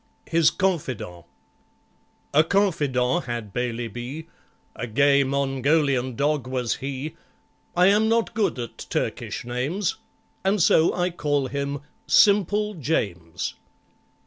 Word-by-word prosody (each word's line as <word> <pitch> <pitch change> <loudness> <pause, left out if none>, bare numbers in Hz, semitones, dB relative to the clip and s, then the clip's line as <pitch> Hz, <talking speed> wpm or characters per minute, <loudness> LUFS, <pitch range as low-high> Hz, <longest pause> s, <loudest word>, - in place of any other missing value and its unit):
His 165 -1 +4
Confidant 130 - -2 1.1
A 155 +2 +6
confidant 155 -6 +1
had 115 -5 -5
BAILEY 120 -1 -2
B., 120 +8 -7 0.5
A 120 - -4
gay 140 +4 +4
Mongolian 135 -1 +1
dog 145 -1 0
was 125 -2 -1
he; 140 +3 -5 0.6
I 180 - +6
am 210 +3 +4
not 230 0 +1
good 215 -10 0
at 120 -2 -6
Turkish - - -3
names, 140 +11 -2 0.5
And 195 +2 +2
so 165 -1 +5
I 180 0 0
call 145 -4 0
him 140 +1 -3 0.3
SIMPLE 210 +1 +4
JAMES. 90 - -2
140 Hz, 115 wpm, -24 LUFS, 125-175 Hz, 1.1 s, A